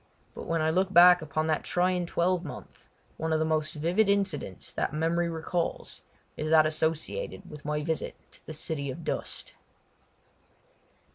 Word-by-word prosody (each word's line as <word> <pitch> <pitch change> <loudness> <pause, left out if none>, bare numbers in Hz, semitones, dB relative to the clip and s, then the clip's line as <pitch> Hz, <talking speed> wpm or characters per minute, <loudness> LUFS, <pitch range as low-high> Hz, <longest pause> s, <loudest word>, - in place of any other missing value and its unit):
But - - -8
when 165 -1 +1
I 160 - +2
look 185 +3 +1
back 180 -1 +8
upon 155 +1 -2
that 155 -1 0
trying 180 0 +1
twelvemonth 175 -2 -2 0.3
one 160 +1 -2
of 160 - +3
the 155 - +1
most 155 0 0
vivid 175 +8 +2
incidents 190 - -1
that - - -2
memory 170 +2 +1
recalls 165 +1 -3 0.3
is 155 - -3
that 155 -1 +6
associated 160 - -1
with 150 -1 -11
my 150 0 -1
visit 160 0 -2 0.2
to - - -14
the 155 - -6
City 150 -2 -3
of 130 - -6
Dust. - - -4
160 Hz, 155 wpm, -28 LUFS, 155-175 Hz, 0.3 s, back